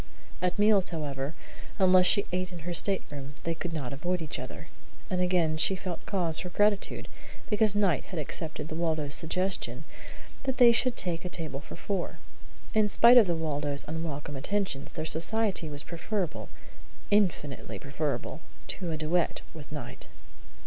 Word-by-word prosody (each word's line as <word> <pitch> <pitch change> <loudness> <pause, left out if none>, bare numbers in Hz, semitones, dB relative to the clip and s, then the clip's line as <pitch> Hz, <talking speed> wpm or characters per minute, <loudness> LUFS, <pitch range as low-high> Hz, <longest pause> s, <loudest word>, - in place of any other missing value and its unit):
At 180 -1 0
meals, 205 -2 +4
however, 145 -2 -4 0.4
unless 185 -1 +6
she 200 - +4
ate 185 0 -2
in 170 -3 -9
her 175 - -2
stateroom, 145 -7 -1
they 165 - -1
could 165 +1 -5
not 140 -5 -4
avoid 175 +6 -1
each 160 -3 -3
other; 130 +5 -8 0.4
and 180 -1 +1
again 175 -3 +2
she 190 +5 +3
felt 180 -2 -5
cause 170 -5 +1
for 180 - -4
gratitude 205 +2 +1 0.4
because 210 -1 +4
Knight 195 -8 +2
had 180 - -7
accepted 155 +1 -2
the 160 - -6
Waldos' 155 -3 -1
suggestion 185 +3 0 0.6
that 265 -1 -2
they 245 -2 +8
should 245 +1 +2
take 170 -2 0
a 180 - -4
table 155 -6 -4
for 145 - -10
four. 195 -4 -3 0.6
In 215 -1 +3
spite 235 +4 +8
of 215 - +4
the 170 - +1
Waldos' 145 -3 0
unwelcome 150 -2 -4
attentions, 155 -1 -2
their 155 - -4
society 185 +2 +2
was 145 -1 -7
preferable 175 +1 -3 0.6
infinitely 175 -9 +1
preferable 145 +2 -3 0.3
to 180 -3 -2
a 160 - -2
duet 160 +3 0
with 150 -3 -11
Knight. 145 -6 -7
170 Hz, 160 wpm, -29 LUFS, 155-190 Hz, 0.6 s, they